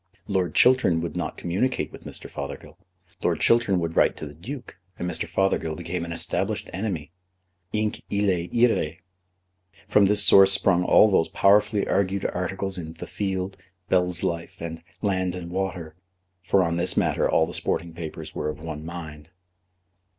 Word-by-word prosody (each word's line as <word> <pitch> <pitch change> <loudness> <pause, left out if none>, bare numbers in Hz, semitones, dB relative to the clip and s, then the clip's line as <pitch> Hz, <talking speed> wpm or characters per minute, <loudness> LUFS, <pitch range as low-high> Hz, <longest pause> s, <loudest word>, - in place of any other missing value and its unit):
Lord 95 -5 -1
Chiltern 125 -10 +4
would 85 -2 -5
not - - -3
communicate 100 +10 -1
with - - -13
Mr. - - -5
Fothergill. - - -7 0.5
Lord - - 0
Chiltern 115 -6 +3
would 85 -1 -3
write - - +3
to - - -6
the 70 - -9
Duke, 120 - -9 0.2
and 90 - -3
Mr. 90 - -2
Fothergill 95 -5 0
became 85 +2 -4
an 85 - -7
established 85 - -2
enemy. 95 -7 -4 0.6
Hinc 105 0 -1
illæ 95 -4 0
iræ. 115 -10 +2 0.9
From 100 -1 +4
this 105 +1 +6
source 95 0 +7
sprung 90 -2 +2
all 105 - +6
those 85 -5 +2
powerfully 105 +1 +3
argued 100 0 0
articles 95 +1 -2
in 80 -1 -7
The 80 - -8
Field, 95 -1 -3 0.3
Bell's 90 -1 +2
Life, 85 0 -3
and 80 0 -6 0.2
Land 95 -3 0
and 85 -1 -7
Water; 90 -4 -4 0.5
for 95 +1 +2
on 85 0 -1
this 85 +1 +2
matter - - +1
all 80 - +3
the - - -8
sporting 85 0 -1
papers 80 -2 -7
were - - -3
of 75 - -6
one 80 -1 -6
mind. 80 -2 -8
90 Hz, 165 wpm, -25 LUFS, 85-100 Hz, 0.9 s, source